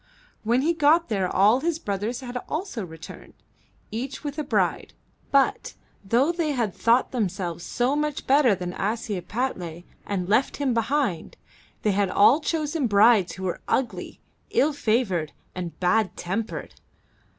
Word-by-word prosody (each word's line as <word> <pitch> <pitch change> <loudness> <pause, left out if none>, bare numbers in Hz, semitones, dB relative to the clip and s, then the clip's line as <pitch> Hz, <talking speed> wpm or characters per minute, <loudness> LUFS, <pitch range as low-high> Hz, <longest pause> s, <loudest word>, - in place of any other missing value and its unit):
When 240 +4 +2
he 335 +3 +2
got 320 +1 +3
there 195 -4 0
all 210 +6 +4
his 325 +2 -1
brothers 215 -1 -3
had 250 -1 -7
also 310 - -3
returned, 160 -2 -11 0.6
each 250 +5 -5
with 290 +1 -4
a - - -1
bride, - - -1 0.3
but, 405 - +1 0.3
though 240 - +2
they 335 -4 -1
had 230 -7 -1
thought 235 +7 +2
themselves 185 -7 -2
so 245 +9 0
much 300 -1 -2
better 265 -6 +4
than 180 -1 -5
Ashiepattle 200 -4 -3 0.2
and 185 -3 -2
left 220 +7 +2
him 275 -3 0
behind, 230 - -1 0.5
they 210 - +3
had 200 0 +1
all 240 +11 +5
chosen 310 -3 -1
brides 205 -2 +5
who 190 - -8
were 180 -2 -3
ugly, 220 -9 -2 0.3
ill 300 +2 +2
favored, 215 - 0 0.2
and 175 -2 -6
bad 185 +1 +1
tempered. 195 +6 -4
230 Hz, 145 wpm, -25 LUFS, 190-280 Hz, 0.6 s, all